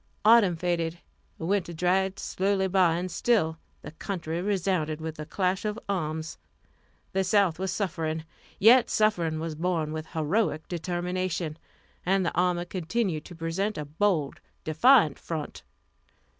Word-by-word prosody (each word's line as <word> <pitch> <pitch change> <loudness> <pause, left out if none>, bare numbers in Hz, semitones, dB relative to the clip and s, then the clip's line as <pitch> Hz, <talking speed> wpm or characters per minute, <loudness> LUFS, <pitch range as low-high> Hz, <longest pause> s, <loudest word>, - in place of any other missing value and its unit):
Autumn 215 -5 +6
faded, 170 -1 -1 0.4
winter 175 +1 -1
dragged 185 +3 +1
slowly 190 0 0
by, 180 -3 +3
and 180 +1 -3
still 170 -5 +1 0.2
the 150 - -8
country 165 -1 -4
resounded 180 -5 0
with 160 0 -5
the 150 0 -7
clash 185 -1 0
of 210 0 -2
arms. 160 -4 -3 0.7
The 190 0 +2
South 190 -3 +2
was 190 -1 -1
suffering, 160 -5 -2 0.3
yet 235 +4 +6
suffering 175 -7 +1
was 165 0 -3
borne 160 -1 -1
with 155 0 -5
heroic 160 +2 -1
determination, 175 -1 -2 0.5
and 190 +1 +2
the - - -1
army 175 0 +1
continued 180 -2 -2
to 175 - -10
present 170 +6 -2
a 150 - -4
bold, 155 -1 0 0.2
defiant 165 - +4
front. 160 -3 -5
175 Hz, 135 wpm, -27 LUFS, 160-195 Hz, 0.7 s, Autumn